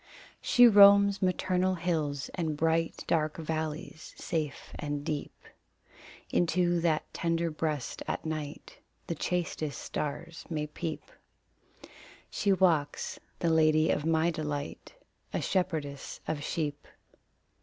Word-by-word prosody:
She 245 0 +7
roams 200 -1 +7
maternal 185 0 +1
hills 155 -5 -1
and 160 -4 -2
bright, 165 +1 0
Dark 155 -2 0
valleys 160 +1 -4
safe 155 -4 -3
and 145 -1 -3
deep. 150 -3 -4 0.9
Into 175 0 +2
that 160 -2 +2
tender 165 0 0
breast 155 -4 -3
at - - -3
night 155 -2 -5 0.3
The - - -2
chastest 160 -3 -2
stars 160 +3 -5
may 155 -3 -2
peep. 155 +1 -5 1.3
She 200 - +1
walks 170 -7 +1 0.2
the 170 - +1
lady 155 0 +4
of - - 0
my 165 +1 +2
delight 150 - -5 0.4
A - - 0
shepherdess 155 -7 -2
of 145 -2 -2
sheep. 150 -2 -3
160 Hz, 110 wpm, -30 LUFS, 150-175 Hz, 1.3 s, She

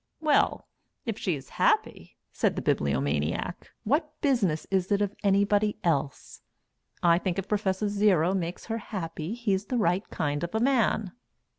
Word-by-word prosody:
"Well 305 -2 +2 0.4
if 225 -3 -3
she 180 -5 0
is 135 -2 -10
happy?" - - +1 0.2
said - - +1
the - - -3
Bibliomaniac. 70 - -1
"What 300 +5 -1
business 210 - +1
is 190 0 0
it 200 - +3
of 205 -1 0
anybody 205 +1 +2
else? 145 -4 -2 0.6
I 170 0 +5
think 185 -1 -2
if 195 0 -3
Prof. 200 -2 0
Zero 200 -4 +3
makes 175 -2 -3
her 225 0 -3
happy 170 -2 -5
he's 205 -5 -1
the 250 +4 -2
right 185 -2 +1
kind 145 -1 -2
of 175 +4 -4
a - - +2
man." 230 -6 +2
195 Hz, 155 wpm, -27 LUFS, 170-215 Hz, 0.6 s, I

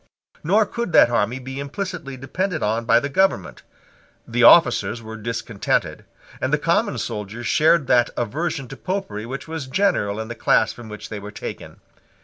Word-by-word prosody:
Nor 205 +7 +3
could 235 -4 -4
that 120 - +6
army 120 +1 +1
be 130 +1 -7
implicitly 145 -2 -5
depended 165 +7 -3
on 115 +2 0
by 115 +1 +5
the 140 - -3
government. 140 - 0 0.7
The 120 +1 -1
officers 120 -3 +6
were 110 -1 -9
discontented; 115 -2 -2 0.4
and - - -1
the - - +3
common - - +1
soldiers 105 +3 -5
shared 155 +2 +3
that 120 -2 +3
aversion 135 +4 -2
to 135 - -9
Popery 115 - -4
which 135 +5 -6
was 160 -4 -5
general 130 - +1
in 110 - -4
the 120 - -5
class 110 -1 +2
from 120 -2 -11
which 105 0 -8
they 110 - -5
were 100 +1 -8
taken. 105 - -8
125 Hz, 170 wpm, -22 LUFS, 110-160 Hz, 0.7 s, that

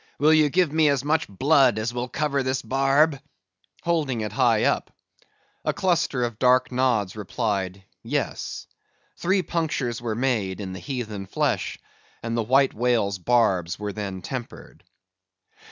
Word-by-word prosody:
Will 155 +2 +4
ye 155 -2 +4
give 175 0 +2
me 155 -1 +4
as 140 -2 +1
much 155 +2 +1
blood 130 +3 +3
as 110 +2 -2
will 125 +1 -3
cover 140 -1 0
this 130 0 -1
barb?" 135 +2 +2 0.6
holding 150 -9 0
it 105 -2 -3
high 115 -2 +3
up. - - 0 0.7
A - - 0
cluster 170 -8 +1
of 115 -2 -3
dark 125 0 +3
nods 125 -7 +1
replied, 100 -3 -3 0.2
Yes. - - -3 0.5
Three 190 +1 +1
punctures 145 -10 -2
were 115 -3 -2
made 110 -7 -1
in 95 -2 -5
the 95 - -7
heathen 110 -8 -5
flesh, - - -1 0.5
and 115 0 -2
the 115 - +1
White 135 +4 +3
Whale's 110 -5 +1
barbs 95 -5 +1
were 105 -1 -4
then 95 -3 -5
tempered. 125 +1 -8
125 Hz, 150 wpm, -24 LUFS, 105-140 Hz, 0.7 s, Will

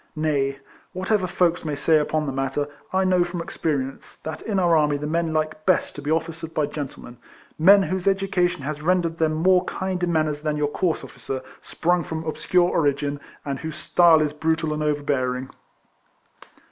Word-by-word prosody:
Nay, 140 -3 0 0.4
whatever 185 +1 0
folks 175 -1 +1
may 150 -2 -2
say 155 +2 +3
upon 155 +1 0
the 140 - -2
matter, 135 +2 -1 0.2
I 190 0 +2
know 185 -1 +3
from 175 0 -5
experience, 140 -5 -3
that 160 0 -5
in 210 -3 -2
our 175 -3 +4
army 150 -2 +3
the 145 - -5
men 165 +1 0
like 155 0 -2
best 185 +1 +2
to 145 - -7
be 145 - -4
officered 165 0 -2
by 155 - +2
gentlemen, 140 -4 -7 0.4
men 195 +5 +7
whose 185 0 -2
education 190 -4 +1
has 150 +1 -4
rendered 170 0 +1
them 160 -1 +2
more 180 +3 +3
kind 190 -1 -3
in 175 -1 +1
manners 155 -2 0
than 150 -1 -1
your 150 -1 0
coarse 170 +2 -1
officer, 130 -1 -6 0.2
sprung 175 +1 0
from 160 +1 -5
obscure 175 +3 +1
origin, 145 -2 0 0.3
and 140 -2 -3
whose 160 -1 -6
style 160 +1 +5
is 150 -1 -2
brutal 160 0 0
and 150 - -3
overbearing. 135 -4 -1
160 Hz, 180 wpm, -23 LUFS, 145-175 Hz, 0.4 s, men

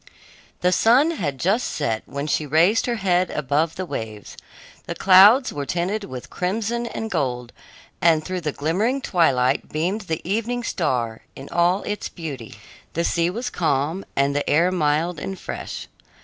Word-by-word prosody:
The 180 - +3
sun 250 - +4
had 150 - -3
just 200 - +1
set 115 -7 -2
when 140 +1 -4
she 155 0 -1
raised 170 - +3
her 240 - 0
head 185 -4 +1
above 150 +3 0
the 185 - -4
waves. 110 -9 -6 0.5
The - - -4
clouds 205 +8 +6
were 140 -1 -4
tinted 190 +4 -1
with 130 -6 -9
crimson 225 +6 -2
and 225 -1 -5
gold, 125 -7 -2 0.5
and 160 -2 +4
through 185 -1 -3
the 155 -2 -2
glimmering 200 - 0
twilight 135 - +2
beamed 180 +8 -1
the 160 +1 -3
evening 230 +5 -1
star 120 - -1
in 135 - -10
all 175 +3 +2
its 210 -1 -4
beauty. 135 -10 -7 0.4
The 170 - 0
sea 170 0 +1
was 235 +7 -4
calm, 160 +3 0
and 140 +1 +1
the 145 - -1
air 170 +5 +3
mild 160 0 0
and 195 +4 -5
fresh. - - -6
170 Hz, 165 wpm, -22 LUFS, 145-200 Hz, 0.5 s, clouds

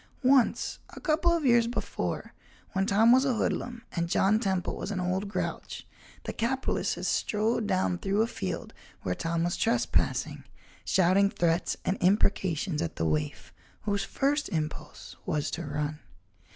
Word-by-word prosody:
Once, 260 -1 +3
a - - -10
couple 325 +1 +2
of 335 -3 +1
years 235 -2 +5
before, 240 - -3 0.4
when 195 +1 0
Tom 220 +4 +5
was 260 +2 +6
a 265 -3 +1
hoodlum 235 +1 -2
and 170 -1 -2
John 200 +4 +3
Temple 190 -5 -1
was - - -5
an 200 -3 -2
old 185 +3 -1
grouch, 200 - -4 0.4
the - - -4
capitalist 260 +3 -1
had - - -5
strode 215 +1 0
down 185 -2 +1
through 200 +2 +1
a - - +1
field 95 - -5 0.3
where 90 - 0
Tom 165 - -1
was 175 0 0
trespassing, 230 +1 0 0.4
shouting 190 +2 +4
threats 170 -2 0
and 190 - +1
imprecations 185 -4 +2
at 165 - -3
the 80 - -1
waif, 75 -1 -2 0.3
whose 200 -2 0
first 285 +7 0
impulse 155 -3 -5
was 155 -5 -1
to 170 -2 -4
run. 150 +1 -3
195 Hz, 155 wpm, -28 LUFS, 170-230 Hz, 0.4 s, was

